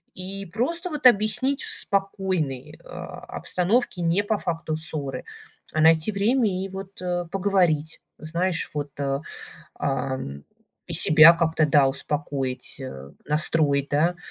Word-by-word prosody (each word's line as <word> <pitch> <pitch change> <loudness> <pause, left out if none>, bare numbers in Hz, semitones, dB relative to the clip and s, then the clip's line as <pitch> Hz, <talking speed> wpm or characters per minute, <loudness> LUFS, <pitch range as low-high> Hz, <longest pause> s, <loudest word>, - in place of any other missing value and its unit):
И 195 +1 -6
просто 330 - -1
вот 295 -4 +4
объяснить, 245 +5 +2
в - - -1
спокойной, 190 -9 -2
а, - - -8 0.2
обстановке, 185 +1 0
не 170 +5 +1
по 210 0 0
факту 165 -3 -3
ссоры, 155 -4 -5 0.5
а 155 - +1
найти 160 +4 +4
время, 220 +4 +2 0.2
и 195 - -5
вот, 190 0 -9
э, 175 -1 -2
поговорить, 180 -6 +1 0.2
знаешь, 170 +2 -2
вот, 145 -1 -3
э, 140 0 -1 0.5
ам, 130 - -3 0.4
и - - -4
себя 155 +2 +8
как-то, 160 -2 +1
да, 140 -2 +5
успокоить, 135 -2 -3
э, 70 - -8
настроить, 150 -2 +1
да. 165 +5 +2
165 Hz, 130 wpm, -24 LUFS, 145-195 Hz, 0.5 s, себя